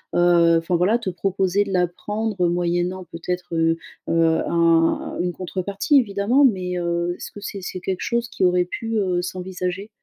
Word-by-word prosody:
heu, 170 -1 +5
enfin, 170 +2 0
voilà, 190 +7 +3
te 230 -5 -4
proposer 190 +2 0
de 195 - -5
la 180 -1 +3
prendre 205 +1 -2
moyennant 175 +1 -1
peut-être, 175 +1 -4
heu 165 0 +2 0.3
heu, 165 -1 +3
un 165 -1 +2
une 175 0 -1
contrepartie, 195 - +1
évidemment, 225 +5 +2
mais, 185 -6 0
heu, 170 0 -1
est-ce - - -8
que 205 - -11
c'est 200 -1 -6
c'est 180 0 -6
quelque 190 -1 -3
chose 235 0 -1
qui 185 - 0
aurait 180 0 +3
pu, 225 +5 -4
heu, 185 -4 +1
s'envisager? 185 +2 -4
180 Hz, 175 wpm, -22 LUFS, 175-200 Hz, 0.3 s, heu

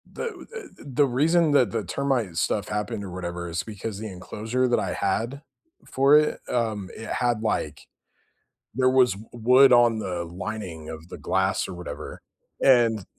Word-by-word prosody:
The - - -6
w - - -11
the 460 -4 -11 0.2
the - - +5
reason 155 +5 +2
that 130 -7 +4
the 115 -2 -2
termite 125 -5 -1
stuff 100 +4 0
happened 105 -1 -3
or 95 - -7
whatever 85 -1 -5
is 85 0 -2
because 105 -1 -6
the 110 - -5
enclosure 110 +7 -2
that 120 - +2
I - - -2
had 115 +8 -1 0.4
for 140 +3 +5
it, 150 0 +1
um, 110 -5 -1
it 115 - -8
had, 120 -3 0
like 110 - -2 0.9
there 130 +2 +3
was 130 -3 +4
w 105 +3 -12
wood 125 +3 +6
on 120 -2 +5
the 90 -4 -3
lining 90 -2 -6
of 80 +1 -9
the - - -8
glass - - 0
or 95 - -7
whatever, 90 0 -8 0.4
and 115 -6 +4
110 Hz, 175 wpm, -25 LUFS, 95-130 Hz, 0.9 s, wood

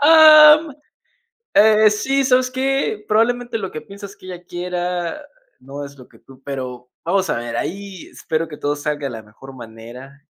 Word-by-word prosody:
¡Am! 310 0 +7 0.8
Eh, 215 0 +5
sí, 270 +6 0
¿sabes 255 -1 +2
qué? 265 -5 -2
Probablemente, 235 +2 0
lo 190 -3 -6
que 155 - -7
piensas 200 +3 -12
que 185 - -16
ella 180 -1 -9
quiera, 175 - -4 0.4
no 140 +2 -9
es 140 0 -11
lo 125 - -15
que - - -22
tú 135 -1 -19
pero, 125 -3 -7
vamos 190 +2 0
a - - -1
ver, 120 0 -5
ahí 195 +1 -6
espero 160 +1 -3
que 150 -2 -10
todo 145 0 -2
salga 145 0 -4
de - - -6
la 110 -2 -9
mejor 130 +6 -15
manera, 120 +4 -12
180 Hz, 175 wpm, -19 LUFS, 135-225 Hz, 0.8 s, Am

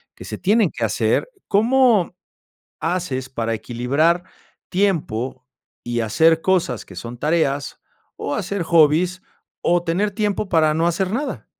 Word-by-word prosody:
que - - -11
se - - -6
tienen 210 -1 +3
que 115 -2 -2
hacer. 110 - 0 0.2
¿Cómo 225 -3 +3 0.6
haces 165 -7 -2
para 115 -3 -2
equilibrar 130 - 0 0.5
tiempo, 135 - -1 0.4
y 120 -1 -2
hacer 160 +9 +3
cosas 175 - 0
que - - -13
son 120 +1 -7
tareas, 145 -1 -1 0.3
o 145 - -3
hacer 200 -2 -2
hobbies, 170 +3 +3 0.4
o 175 0 +2
tener 195 +5 0
tiempo 210 -1 -1
para 155 -4 +3
no 165 +2 +1
hacer 185 +3 0
nada? 275 +6 -3
165 Hz, 135 wpm, -21 LUFS, 130-190 Hz, 0.6 s, tienen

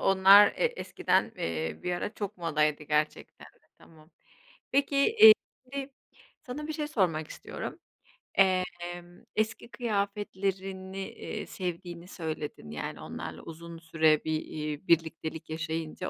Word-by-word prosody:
onlar 195 +2 +8
e - - +1
eskiden, 485 - +1
eee, 80 -1 -2
bir 180 - -1
ara 205 +4 -3
çok 205 0 -4
modaydı 155 -3 +1
gerçekten 150 0 -1
de. - - -23
Tamam. 155 0 -19 0.6
Peki, 280 +1 +2 0.2
iii, 440 0 +12 0.3
şimdi 275 +1 -6 0.5
sana 280 +4 -5
bir - - -1
şey 300 -1 -3
sormak 170 - 0
istiyorum. - - -7 0.6
Emm, 175 -2 0
eski 220 +2 -1
kıyafetlerini, 195 -3 -2
iii, - - -6
sevdiğini 175 -1 -5
söyledin, 155 - -5
yani 75 -2 -5
onlarla - - -7
uzun 170 +1 -9
süre 160 -2 +3
bir, 160 - -2
iii, 150 +2 -5
birliktelik 160 -1 0
yaşayınca 160 +2 -3
175 Hz, 125 wpm, -29 LUFS, 160-200 Hz, 0.6 s, iii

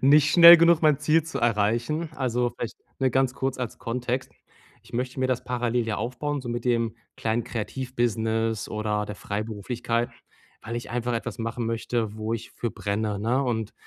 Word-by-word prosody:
nicht 145 +2 +5
schnell 170 0 +11
genug 170 -1 +4
mein 150 -3 +4
Ziel 160 0 +2
zu 160 - -5
erreichen. 120 +8 +1
Also, 125 -3 0
vielleicht, 115 -1 -5 0.2
ne, 130 -1 +3
ganz 130 0 +1
kurz 135 -1 -2
als 125 -3 -4
Kontext: 125 +2 -3 0.5
Ich - - -19
möchte 125 +2 -3
mir 130 - +2
das 130 -1 -1
parallel 120 -1 0
ja 110 - -1
aufbauen, 140 +4 -3
so 125 - -7
mit 120 0 -3
dem 115 -2 +1 0.2
kleinen 115 +1 0
Kreativ-Business 115 -2 -1
oder 105 -1 -1
der 105 -1 -7
Freiberuflichkeit, 115 +3 -3 0.5
weil 115 +2 -5
ich 120 - -6
einfach 120 0 -1
etwas 115 -2 -3
machen 115 +1 -3
möchte, 115 -1 -2
wo 110 +1 -2
ich 115 - -7
für 120 - -3
brenne, 105 0 -2
ne? 120 +6 +1
Und, 115 -5 -2
120 Hz, 175 wpm, -26 LUFS, 110-130 Hz, 0.5 s, schnell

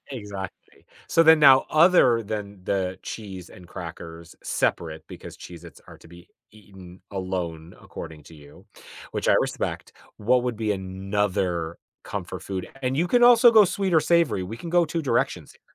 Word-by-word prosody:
Exactly. 105 -7 -9 0.2
So 165 - +4
then, 160 -1 +7
now 135 -2 +7
other 155 -8 +5
than 100 -2 -6
the 95 -1 -2
cheese 95 -5 -8
and 90 - -14
crackers 85 -1 -9
separate 80 -2 -2
because - - -11
Cheez-its 85 -1 -12
are - - -13
to - - -18
be 85 +1 -16 0.2
eaten 95 -4 -15
alone 90 -3 -5
according 80 -2 -10
to 80 - -15
you, 75 -1 -16 0.5
which - - -2
I - - +5
respect, - - -4 0.3
what 120 +4 +2
would 125 -3 -3
be 110 -2 -1
another 95 -3 -2 0.3
comfort - - -6
food? 95 -2 -5
And 130 +1 -1
you 170 +4 +1
can 245 +4 +3
also 240 0 +7
go 220 -2 +7
sweet 190 0 -1
or 160 - +6
savory, 165 - +2
we 105 +5 -7
can 165 +6 -7
go 175 -1 +4
2 165 +2 -3
directions 140 - -1
here. - - -26
100 Hz, 170 wpm, -24 LUFS, 90-135 Hz, 0.5 s, then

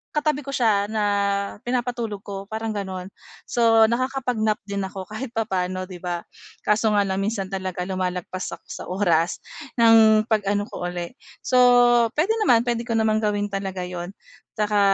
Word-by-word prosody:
katabi 295 -2 0
ko - - -3
siya 205 -4 +2
na 215 -1 -1 0.6
pinapatulog 240 -4 -2
ko 195 -1 -7
parang 220 +1 -3
gano'n. 190 -2 -5 0.3
So, 225 -2 +4
nakakapag-nap 240 -2 0
din 200 0 -4
ako 190 0 -7
kahit 245 +2 -6
papano, 185 -4 -1
'di 185 -1 -9
ba? 175 -1 -4 0.4
Kaso 215 +1 +2
nga 205 - +4
lang 190 -1 -2
minsan 195 -2 -2
talaga 185 -2 -3
lumalagpas 185 0 -3
ako - - -27
sa - - -8
oras 175 -3 +1 0.3
ng 225 -2 +6
pag-ano 205 -2 0
ko 175 - -4
uli. 175 -1 -5 0.3
So, 255 - +1 0.6
puwede 340 +9 +2
naman, 240 - +4
puwede 235 0 -2
ko 230 - -1
naman 220 -1 +2
gawin 205 -1 -1
talaga 195 -2 -3
'yon. 180 +1 -6 0.4
Tsaka 210 -1 +1
210 Hz, 155 wpm, -23 LUFS, 190-225 Hz, 0.6 s, ng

